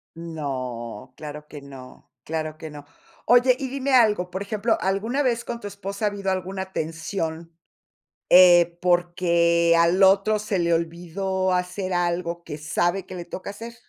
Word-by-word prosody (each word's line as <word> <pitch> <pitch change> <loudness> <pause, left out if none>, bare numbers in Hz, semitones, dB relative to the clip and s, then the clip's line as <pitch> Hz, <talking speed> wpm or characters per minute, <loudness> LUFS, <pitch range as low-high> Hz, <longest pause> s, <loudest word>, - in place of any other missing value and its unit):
No, 130 -8 -6
claro 150 0 -9
que 150 -2 -10
no, 135 -2 -13
claro 155 -1 -4
que 160 - -8
no. 145 -1 -11 0.4
Oye, 245 +1 +5
y 270 -2 -4
dime 270 0 -2
algo, 210 -7 +3
por 190 +2 -5
ejemplo, 215 +2 0
¿alguna 220 +9 0
vez 240 -2 0
con 235 0 -5
tu 205 - -6
esposa 200 +1 -7
ha - - +4
habido 200 -1 -4
alguna 190 +1 -4
tensión, 165 0 -4 0.7
eh, 175 -1 +7
porque 170 -1 +2
al 170 +3 +4
otro 200 +3 +4
se 210 -3 -2
le 170 0 +1
olvidó 180 +3 -2
hacer 180 +1 -2
algo 170 -1 -1
que 150 -2 -7
sabe 175 +5 -1
que 185 - -8
le 175 - -6
toca 185 - -7
hacer? 230 +3 -8
180 Hz, 160 wpm, -24 LUFS, 165-200 Hz, 0.7 s, eh